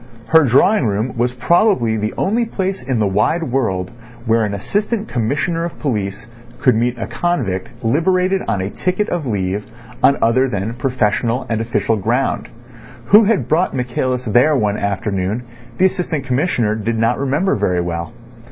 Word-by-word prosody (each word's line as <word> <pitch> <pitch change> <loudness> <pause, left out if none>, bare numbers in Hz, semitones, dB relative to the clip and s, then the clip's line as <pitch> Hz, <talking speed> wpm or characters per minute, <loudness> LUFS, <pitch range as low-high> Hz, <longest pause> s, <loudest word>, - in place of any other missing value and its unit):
Her 160 -2 +6
drawing 135 - +3
room 110 +5 -2
was 120 +1 +1
probably 150 - +2
the 110 0 -2
only 225 +5 +1
place 195 -4 -3
in 130 -3 -2
the 110 - +2
wide 105 - +1
world 115 - -1 0.3
where 115 -1 +2
an 100 -1 -3
Assistant 210 - -2
Commissioner 145 +8 -1
of 170 - -5
Police 105 -6 -3 0.3
could 125 - +4
meet 120 +2 0
a 115 - -3
convict 120 - -2
liberated 185 +9 +1
on 100 - 0
a 95 +2 -3
ticket 185 +3 -1
of 170 -6 -2
leave 100 -2 -1 0.4
on 140 - +4
other 130 +4 +2
than 105 +1 -3
professional 120 -1 0
and 115 -1 0
official 115 -1 0
ground. 120 +7 -1 0.6
Who 210 +2 +7
had 220 -1 +1
brought 170 +4 +1
Michaelis 125 0 -2
there 125 +7 +4
one 105 -6 +1
afternoon 100 +2 -2 0.3
the 185 - +4
Assistant 170 -6 -1
Commissioner 125 -4 0
did 110 +1 -2
not 115 +2 +1
remember 145 +8 +1
very 90 -3 0
well. 85 +2 -4
125 Hz, 160 wpm, -18 LUFS, 105-160 Hz, 0.6 s, Who